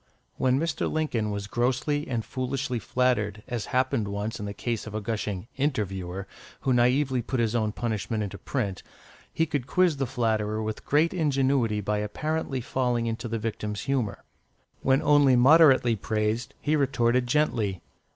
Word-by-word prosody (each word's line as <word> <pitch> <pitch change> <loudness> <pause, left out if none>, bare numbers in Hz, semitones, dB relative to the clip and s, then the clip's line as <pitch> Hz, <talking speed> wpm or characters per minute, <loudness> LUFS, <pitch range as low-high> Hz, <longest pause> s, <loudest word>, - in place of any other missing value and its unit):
When 130 0 +2
Mr. 160 -1 -1
Lincoln 125 -9 -1
was 100 -1 -3
grossly 130 +7 0
and 115 -3 -2
foolishly 130 -1 -2
flattered, 110 -3 0
as 120 -4 -3
happened 125 -4 +1
once 100 +2 -3
in 105 - -4
the - - -4
case 115 -1 -3
of 110 - -7
a - - 0
gushing 105 -2 -3
"interviewer," 95 -9 -2 0.4
who 130 - +1
naïvely 125 +2 +2
put 130 - -1
his 115 -1 +1
own 110 -3 +1
punishment 110 -1 -2
into 100 - -6
print, 100 -9 -3 0.5
he 165 - +1
could 145 -5 -3
quiz 180 -1 +3
the 135 -1 -1
flatterer 110 -3 0
with 110 0 -5
great 155 +4 +3
ingenuity 135 - +1
by 105 +1 -1
apparently 135 +5 -2
falling 125 -1 0
into 115 +1 -3
the 115 0 -2
victim's 105 -2 -3
humour. 125 -8 -2 0.6
When 135 +1 +2
only 145 -3 +5
moderately 130 -2 +6
praised, 110 +2 -2
he 150 +1 +1
retorted 125 -3 +2
gently. 115 - 0
120 Hz, 160 wpm, -27 LUFS, 105-135 Hz, 0.6 s, moderately